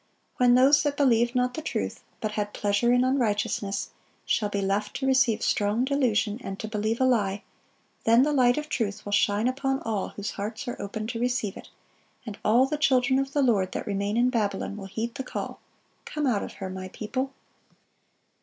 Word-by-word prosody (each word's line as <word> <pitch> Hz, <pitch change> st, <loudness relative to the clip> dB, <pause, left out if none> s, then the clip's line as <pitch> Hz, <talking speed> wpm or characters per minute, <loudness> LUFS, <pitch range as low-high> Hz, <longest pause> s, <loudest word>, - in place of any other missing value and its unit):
When 245 Hz, -1 st, +5 dB
those 270 Hz, +3 st, +6 dB
that 290 Hz, -1 st, -1 dB
"believed 240 Hz, -3 st, +3 dB
not 250 Hz, 0 st, +1 dB
the 315 Hz, -, -4 dB
truth, -, -, -3 dB, 0.2 s
but 215 Hz, -, -1 dB
had 210 Hz, -1 st, -3 dB
pleasure 205 Hz, +4 st, +2 dB
in 245 Hz, 0 st, +4 dB
unrighteousness,"(643) 215 Hz, -6 st, 0 dB, 0.3 s
shall 210 Hz, -2 st, +1 dB
be 205 Hz, -, -2 dB
left 200 Hz, +2 st, -1 dB
to 270 Hz, -, -2 dB
receive 260 Hz, -4 st, +3 dB
strong 210 Hz, +4 st, +1 dB
delusion 245 Hz, -5 st, +1 dB
and 195 Hz, 0 st, -6 dB
to 215 Hz, -, -4 dB
believe 215 Hz, +1 st, -1 dB
a -, -, +3 dB
lie, 205 Hz, -6 st, +1 dB, 0.6 s
then 230 Hz, +3 st, +5 dB
the 300 Hz, +1 st, +1 dB
light 250 Hz, -2 st, +4 dB
of 300 Hz, 0 st, -3 dB
truth 215 Hz, -7 st, -2 dB
will 205 Hz, -, -5 dB
shine 205 Hz, +2 st, +2 dB
upon 270 Hz, +1 st, 0 dB
all 215 Hz, -3 st, -1 dB
whose 205 Hz, 0 st, -5 dB
hearts 220 Hz, +6 st, -5 dB
are 245 Hz, -, -4 dB
open 200 Hz, +2 st, -4 dB
to 230 Hz, +1 st, -4 dB
receive 245 Hz, -5 st, -1 dB
it, -, -, -11 dB, 0.6 s
and 210 Hz, -3 st, -7 dB
all 240 Hz, +5 st, +5 dB
the 295 Hz, +3 st, -2 dB
children 260 Hz, -3 st, +3 dB
of 275 Hz, 0 st, -3 dB
the 285 Hz, -, +2 dB
Lord 200 Hz, -7 st, +2 dB
that -, -, -4 dB
remain 200 Hz, +1 st, -1 dB
in 245 Hz, +1 st, +3 dB
Babylon 205 Hz, -4 st, -1 dB
will 195 Hz, -2 st, -7 dB
heed 225 Hz, +4 st, -4 dB
the 265 Hz, -, -5 dB
call, -, -, -5 dB, 0.5 s
"Come 300 Hz, -1 st, -2 dB
out 230 Hz, -7 st, +1 dB
of -, -, -6 dB
her, 190 Hz, -, -6 dB
My 185 Hz, 0 st, -6 dB
people." 255 Hz, +7 st, -4 dB
230 Hz, 200 wpm, -26 LUFS, 205-260 Hz, 0.6 s, those